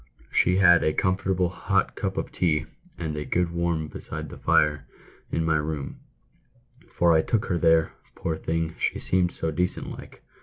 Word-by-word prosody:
" - - -28
She 90 - +3
had 85 -3 +6
a 80 - +2
comfortable 95 -1 +1
hot 90 - 0
cup - - -3
of - - -3
tea 80 -4 +1 0.3
and 80 -2 -4
a 75 - -3
good 85 +3 0
warm 85 -2 -1
beside - - -7
the - - -10
fire 75 -2 +2 0.4
in 80 - 0
my 80 -1 +2
room 75 -2 -4 0.5
— 125 +4 -31
for 85 -1 +4
I 80 - +5
took 110 +5 0
her 90 -2 -1
there, 80 -1 +4 0.2
poor 80 - -2
thing, 80 0 -2
she - - 0
seemed 90 -1 +1
so 80 - -2
decent 90 +4 -1
like. - - -11
85 Hz, 185 wpm, -25 LUFS, 80-90 Hz, 0.5 s, had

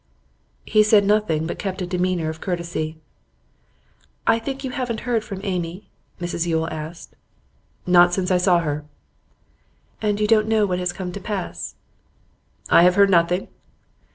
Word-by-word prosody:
He 215 - +4
said 210 -1 +5
nothing, 205 -7 +1
but 170 - -5
kept 190 -1 -4
a 180 - -2
demeanour 180 -2 -1
of 160 0 -7
courtesy. 170 -3 -3 1.3
'I 225 - +3
think 270 +3 -5
you 260 - -3
haven't 250 -5 -3
heard 235 -2 0
from 195 -3 -7
Amy?' 180 -1 -4 0.3
Mrs 175 -1 -2
Yule 160 -1 0
asked. 160 +2 -8 0.7
'Not 175 -1 +6
since 185 0 -1
I 180 - +4
saw 180 -1 +3
her.' 150 -2 -3 1.2
'And 210 -1 0
you 210 - +2
don't 215 0 +3
know 220 -1 +3
what 180 -2 -1
has 180 -1 -1
come 180 0 -6
to 200 - -6
pass?' 185 - -5 1.0
'I - - +7
have 180 +1 +5
heard 200 0 +5
of - - +1
nothing. 175 +1 +2
180 Hz, 160 wpm, -22 LUFS, 170-210 Hz, 1.3 s, I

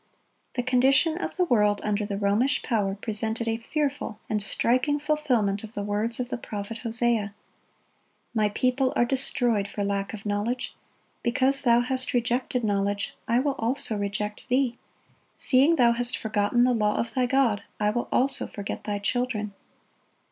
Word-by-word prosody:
The 245 - 0
condition 265 +5 +3
of - - -4
the 365 - +3
world 210 -7 +3
under 210 0 -1
the 200 -2 -3
Romish 210 +7 +1
power 205 -5 0
presented 220 +2 -2
a 225 0 0
fearful 275 -3 -3
and 210 -1 +1
striking 255 +8 +1
fulfilment 255 -10 0
of 220 +1 -10
the 205 - -2
words 210 +3 -1
of 250 -1 -2
the - - -3
prophet 210 +1 -6
Hosea: 230 -3 0 1.0
"My 215 -2 +2
people 255 +5 +1
are 240 - +3
destroyed 240 -5 +1
for 205 0 -4
lack 200 0 -1
of 210 - -12
knowledge: 210 +5 -2 0.5
because 265 +3 +2
thou 235 -2 +4
hast 255 +1 -2
rejected 245 +1 0
knowledge, 200 -1 0
I 235 +2 +3
will 285 0 0
also 230 -1 0
reject 210 +3 -3
thee:... 250 -1 +1 0.6
seeing 280 +6 +4
thou 240 -5 +5
hast 240 +1 +2
forgotten 215 +2 +1
the 250 0 +3
law 210 -2 +1
of 230 0 -2
thy 255 -1 +1
God, 245 -6 +2 0.2
I 210 0 +2
will 240 +2 -2
also 270 +2 +1
forget 200 -1 -6
thy 205 -1 -1
children." 215 -1 -2
235 Hz, 160 wpm, -26 LUFS, 210-255 Hz, 1.0 s, thou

